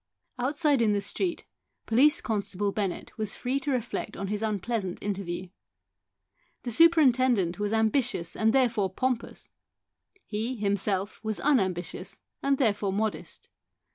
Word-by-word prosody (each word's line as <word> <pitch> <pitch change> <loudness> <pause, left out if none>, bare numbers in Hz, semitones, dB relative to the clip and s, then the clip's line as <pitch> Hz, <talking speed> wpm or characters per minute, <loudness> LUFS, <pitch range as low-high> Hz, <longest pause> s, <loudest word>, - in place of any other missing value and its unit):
Outside 285 +1 +2
in 215 -2 +3
the 205 - +1
street, 345 - -2 0.4
Police 290 +9 +4
constable 205 -2 -1
Bennett 195 -3 -3
was 215 -2 0
free 260 +3 -1
to 275 - -5
reflect 245 -2 -3
on 195 -1 -4
his 210 0 -2
unpleasant 215 -2 -2
interview. 185 -3 -4 1.1
The 240 - -3
superintendent 255 - +4
was 205 0 -1
ambitious 220 -5 0
and 220 +1 +2
therefore 235 -6 +2
pompous; 250 +3 -3 0.7
he, 225 +4 -3
himself, 200 -1 -1
was 220 -1 -1
unambitious 190 - -1 0.2
and 275 0 +2
therefore 205 -6 +1
modest. 215 +2 -3
220 Hz, 125 wpm, -28 LUFS, 200-255 Hz, 1.1 s, Police